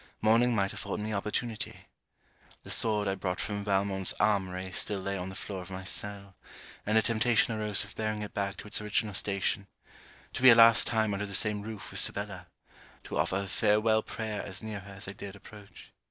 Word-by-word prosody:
Morning 115 Hz, +3 st, +4 dB
might 100 Hz, -2 st, +1 dB
afford 100 Hz, -, -4 dB
me 105 Hz, +1 st, -3 dB
opportunity. 105 Hz, +3 st, -3 dB, 0.8 s
The -, -, -6 dB
sword 105 Hz, -2 st, +4 dB
I 95 Hz, -, +1 dB
brought 95 Hz, -1 st, -3 dB
from 100 Hz, -1 st, -3 dB
Valmont's 95 Hz, -1 st, 0 dB
armoury 95 Hz, -2 st, 0 dB
still 100 Hz, +2 st, -1 dB
lay 100 Hz, +1 st, -3 dB
on 90 Hz, 0 st, -4 dB
the 95 Hz, -, -9 dB
floor 95 Hz, 0 st, -5 dB
of 90 Hz, -, -10 dB
my 95 Hz, 0 st, -6 dB
cell; 100 Hz, +1 st, -3 dB, 0.5 s
and 110 Hz, +1 st, +3 dB
a 110 Hz, -, +4 dB
temptation 115 Hz, +1 st, +2 dB
arose 105 Hz, -2 st, -1 dB
of 105 Hz, -, -12 dB
bearing 110 Hz, -1 st, -2 dB
it 105 Hz, -, -7 dB
back 100 Hz, -1 st, -2 dB
to -, -, -9 dB
its 105 Hz, -, 0 dB
original 105 Hz, 0 st, -1 dB
station: 100 Hz, 0 st, -1 dB, 0.7 s
to -, -, -4 dB
be 130 Hz, -, +9 dB
a 115 Hz, -, +9 dB
last 115 Hz, 0 st, +7 dB
time 110 Hz, -2 st, +1 dB
under 105 Hz, +1 st, -2 dB
the 100 Hz, -, -3 dB
same 105 Hz, 0 st, +1 dB
roof 110 Hz, -1 st, -8 dB
with -, -, -2 dB
Sibella, 100 Hz, -3 st, 0 dB, 0.6 s
to -, -, -4 dB
offer 95 Hz, +1 st, +1 dB
a -, -, -6 dB
farewel 110 Hz, +2 st, +3 dB
prayer 110 Hz, -1 st, -4 dB
as 100 Hz, +2 st, -7 dB
near 110 Hz, -2 st, -4 dB
her 100 Hz, +1 st, -11 dB
as 95 Hz, +1 st, -9 dB
I 95 Hz, -, -6 dB
dared 100 Hz, 0 st, -8 dB
approach. 100 Hz, 0 st, -14 dB
105 Hz, 205 wpm, -30 LUFS, 100-110 Hz, 0.8 s, be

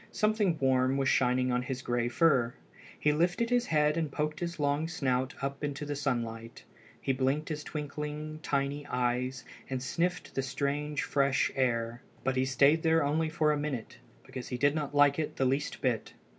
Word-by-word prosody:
Something 215 Hz, -5 st, +1 dB
warm 130 Hz, -1 st, +2 dB
was 135 Hz, -1 st, +2 dB
shining 125 Hz, 0 st, +2 dB
on 125 Hz, 0 st, +1 dB
his 125 Hz, 0 st, -4 dB
gray 120 Hz, -1 st, 0 dB
fur. 125 Hz, -2 st, +3 dB, 0.4 s
He 150 Hz, -, +3 dB
lifted 175 Hz, +9 st, +1 dB
his 245 Hz, 0 st, +2 dB
head 150 Hz, 0 st, +2 dB
and 160 Hz, -3 st, -1 dB
poked 150 Hz, +1 st, -2 dB
his 170 Hz, -1 st, -4 dB
long 145 Hz, +2 st, +1 dB
snout 130 Hz, -6 st, -1 dB
up 140 Hz, +1 st, -3 dB
into 145 Hz, 0 st, -3 dB
the 145 Hz, 0 st, -3 dB
sunlight. 115 Hz, -5 st, -3 dB, 0.4 s
He 135 Hz, -, 0 dB
blinked 135 Hz, +4 st, 0 dB
his 150 Hz, -1 st, -3 dB
twinkling, 150 Hz, +1 st, -5 dB
tiny 140 Hz, 0 st, -1 dB
eyes 125 Hz, 0 st, -1 dB, 0.2 s
and 130 Hz, -1 st, -1 dB
sniffed 175 Hz, +6 st, -1 dB
the 135 Hz, -, 0 dB
strange 145 Hz, +2 st, -2 dB
fresh 140 Hz, -1 st, +2 dB
air. 120 Hz, -2 st, 0 dB, 0.2 s
But 135 Hz, 0 st, 0 dB
he 130 Hz, 0 st, +2 dB
stayed 140 Hz, +4 st, +4 dB
there 160 Hz, -1 st, +3 dB
only 155 Hz, +3 st, +1 dB
for 155 Hz, -1 st, +2 dB
a 150 Hz, -, +1 dB
minute, 140 Hz, -6 st, -4 dB, 0.3 s
because 130 Hz, -2 st, -7 dB
he 125 Hz, -, -3 dB
did 145 Hz, +3 st, +3 dB
not 150 Hz, -2 st, -3 dB
like 145 Hz, 0 st, +5 dB
it 155 Hz, -, -2 dB
the 135 Hz, -, +1 dB
least 135 Hz, +3 st, -1 dB
bit. 120 Hz, -5 st, -1 dB
140 Hz, 185 wpm, -30 LUFS, 130-150 Hz, 0.4 s, like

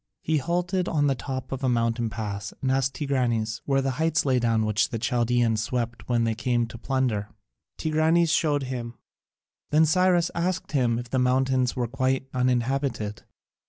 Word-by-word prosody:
He 160 Hz, 0 st, +1 dB
halted 180 Hz, +4 st, -1 dB
on 145 Hz, -3 st, +1 dB
the 140 Hz, -, +3 dB
top 130 Hz, 0 st, -5 dB
of 135 Hz, 0 st, -4 dB
a 130 Hz, -, +2 dB
mountain 115 Hz, -1 st, 0 dB
pass 105 Hz, -1 st, -5 dB
and 130 Hz, -, 0 dB
asked 135 Hz, 0 st, +1 dB
Tigranes 120 Hz, -6 st, -1 dB
where 135 Hz, -1 st, +1 dB
the 135 Hz, -, 0 dB
heights 160 Hz, -1 st, +2 dB
lay 130 Hz, -2 st, +3 dB
down 115 Hz, -2 st, +1 dB
which 110 Hz, 0 st, +1 dB
the 115 Hz, -, -3 dB
Chaldaeans 120 Hz, -1 st, +1 dB
swept 120 Hz, +1 st, -3 dB
when 120 Hz, -1 st, +2 dB
they 115 Hz, -1 st, +1 dB
came 120 Hz, +1 st, 0 dB
to 115 Hz, -, -9 dB
plunder. 125 Hz, -6 st, -1 dB, 0.5 s
Tigranes 160 Hz, +1 st, +2 dB
showed 145 Hz, -4 st, +2 dB
him. 120 Hz, -2 st, -5 dB, 0.7 s
Then 155 Hz, +2 st, +5 dB
Cyrus 175 Hz, +1 st, +3 dB
asked 180 Hz, +2 st, -2 dB
him 125 Hz, -6 st, +2 dB
if 120 Hz, 0 st, -6 dB
the 130 Hz, -, +1 dB
mountains 130 Hz, 0 st, +2 dB
were 125 Hz, -, 0 dB
quite 130 Hz, +1 st, 0 dB
uninhabited. 125 Hz, -3 st, -1 dB
130 Hz, 170 wpm, -26 LUFS, 115-145 Hz, 0.7 s, Then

